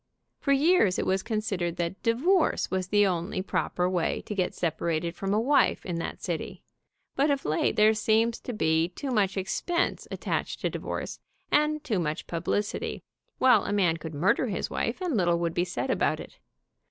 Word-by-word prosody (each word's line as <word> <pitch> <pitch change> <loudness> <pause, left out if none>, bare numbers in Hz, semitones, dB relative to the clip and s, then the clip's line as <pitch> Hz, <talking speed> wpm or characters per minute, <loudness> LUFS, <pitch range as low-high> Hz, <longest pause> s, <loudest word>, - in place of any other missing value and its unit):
For 280 - 0
years 275 - +4
it - - -1
was 190 0 +1
con 215 0 -2
sidered 175 -5 -2
that 175 +2 -3
divorce 310 +10 +2
was 185 -1 -1
the 205 +1 +4
only 180 0 -1
proper 180 -2 -1
way 180 -2 0
to - - -4
get 185 -3 -1
separated 170 0 -1
from 195 +1 -3
a 210 - +3
wife 275 +5 +2
in 175 -2 -3
that 165 - -5
city, - - -4 0.5
but 280 +3 +2
of 280 -1 0
late 155 - +1
there 215 +1 +5
seems 225 +1 +2
to - - -6
be 160 -5 +1
too 265 +9 -5
much 200 -4 +1
expense 340 - -1
attached - - -3
to - - 0
divorce, - - -5 0.3
and 300 0 +2
too 215 -9 0
much 155 -1 -2
publicity, 175 +5 -2 0.3
while 250 -6 +5
a - - -2
man 180 -5 +2
could 160 -1 -7
murder 185 - +2
his 205 - -3
wife 235 +10 -2
and 350 -7 -1
little 175 -4 +2
would 170 -1 -1
be 175 - +1
said - - -2
about - - +1
it. - - -11
195 Hz, 190 wpm, -27 LUFS, 175-235 Hz, 0.5 s, there